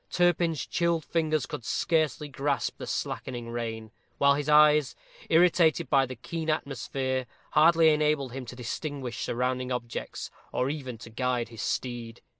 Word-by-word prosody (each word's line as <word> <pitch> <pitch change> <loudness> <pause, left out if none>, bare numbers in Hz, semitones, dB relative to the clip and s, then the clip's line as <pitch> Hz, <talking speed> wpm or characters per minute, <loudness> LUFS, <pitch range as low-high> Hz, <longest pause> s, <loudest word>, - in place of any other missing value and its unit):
Turpin's 170 -4 +2
chilled 170 -2 0
fingers 155 -4 0
could - - -6
scarcely 155 +2 0
grasp 140 -1 -2
the - - -6
slackening 120 -2 -4
rein, 115 -2 -4 0.3
while 140 0 +5
his 145 +1 -2
eyes, 150 -2 +5 0.3
irritated 165 -1 +4
by 135 -2 +4
the 130 - -6
keen 160 +7 -5
atmosphere, 130 -3 -2 0.2
hardly 160 +1 +6
enabled 150 -3 +1
him 130 0 -6
to 125 - -8
distinguish 125 +1 -5
surrounding 125 +1 -1
objects, 120 -2 -4 0.2
or 130 +2 0
even 130 -6 -6
to 115 - -11
guide 125 0 -1
his 115 -2 -8
steed. 120 -2 -3
135 Hz, 145 wpm, -28 LUFS, 125-155 Hz, 0.3 s, hardly